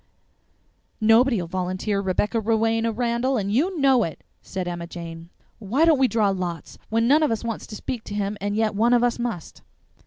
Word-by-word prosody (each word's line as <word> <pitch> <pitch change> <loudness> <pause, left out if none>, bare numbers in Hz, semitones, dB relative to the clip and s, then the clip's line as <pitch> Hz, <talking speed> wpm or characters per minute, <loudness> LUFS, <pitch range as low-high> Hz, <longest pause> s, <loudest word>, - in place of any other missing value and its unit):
"Nobody'll 225 -2 +4
volunteer, 185 +3 -2
Rebecca 200 +4 0
Rowena 225 +1 +1
Randall, 240 +3 0
and 200 -1 -2
you 335 - +1
know 270 -3 +4
it," 165 - -6 0.2
said 185 -2 -5
Emma 170 -1 -5
Jane. 170 -1 -9 0.3
"Why 235 +10 +1
don't 320 -4 +4
we 265 - +5
draw 220 -4 +2
lots, 180 -3 -4
when 230 +1 +1
none 295 +5 +5
of 305 - +2
us 225 0 -2
wants 230 -2 -4
to 215 - -8
speak 235 +1 -5
to 205 - -6
him 205 0 -2
and 205 +1 -2
yet 220 0 +1
one 230 +4 +3
of 240 -1 +4
us 245 0 +1
must?" 230 -9 -5
220 Hz, 190 wpm, -24 LUFS, 190-240 Hz, 0.3 s, we